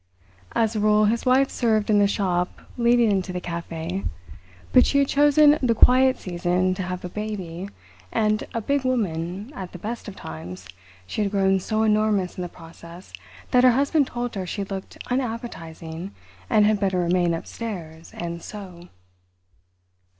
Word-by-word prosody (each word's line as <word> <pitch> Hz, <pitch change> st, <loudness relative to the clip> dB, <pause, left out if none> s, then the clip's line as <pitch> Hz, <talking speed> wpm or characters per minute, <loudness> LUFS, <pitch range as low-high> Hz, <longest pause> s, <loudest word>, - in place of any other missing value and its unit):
As 225 Hz, -1 st, +1 dB
a -, -, 0 dB
rule 210 Hz, 0 st, +4 dB
his 230 Hz, +4 st, 0 dB
wife 265 Hz, +2 st, +4 dB
served 220 Hz, -3 st, +1 dB
in 205 Hz, -, +5 dB
the 200 Hz, -, +5 dB
shop 180 Hz, -3 st, -1 dB
leading 235 Hz, -2 st, +4 dB
into 190 Hz, -1 st, 0 dB
the 180 Hz, -, -3 dB
café, 170 Hz, +1 st, -5 dB, 0.7 s
but 255 Hz, -, +8 dB
she 280 Hz, -, +2 dB
had 280 Hz, -1 st, +4 dB
chosen 295 Hz, +1 st, +5 dB
the 240 Hz, -3 st, +2 dB
quiet 260 Hz, +3 st, +5 dB
season 180 Hz, +1 st, 0 dB
to 185 Hz, -, -4 dB
have 180 Hz, 0 st, -4 dB
a -, -, -2 dB
baby, 195 Hz, -3 st, -5 dB, 0.4 s
and, 215 Hz, 0 st, +1 dB
a 230 Hz, -, -2 dB
big 280 Hz, +4 st, 0 dB
woman 200 Hz, -, -2 dB
at 185 Hz, -7 st, -7 dB
the -, -, -6 dB
best 225 Hz, +7 st, -6 dB
of 200 Hz, -, -7 dB
times, 90 Hz, +4 st, -8 dB, 0.4 s
she 215 Hz, -, -3 dB
had 205 Hz, -, +1 dB
grown 195 Hz, -1 st, +2 dB
so 215 Hz, +3 st, -1 dB
enormous 210 Hz, -3 st, +2 dB
in -, -, -5 dB
the 175 Hz, -, -4 dB
process 170 Hz, +1 st, -13 dB, 0.4 s
that 250 Hz, -1 st, +5 dB
her 250 Hz, -1 st, +7 dB
husband 280 Hz, +2 st, +2 dB
told 240 Hz, -1 st, -4 dB
her 190 Hz, -3 st, -4 dB
she 200 Hz, +3 st, -3 dB
looked 195 Hz, -1 st, -7 dB
unappetising, 195 Hz, -8 st, -4 dB, 0.3 s
and 215 Hz, -2 st, +5 dB
had 210 Hz, -1 st, +3 dB
better 195 Hz, -2 st, +1 dB
remain 175 Hz, -1 st, +2 dB
upstairs 165 Hz, -4 st, -7 dB
and 170 Hz, 0 st, -5 dB
sew. 180 Hz, -4 st, -10 dB
200 Hz, 165 wpm, -24 LUFS, 175-230 Hz, 0.7 s, but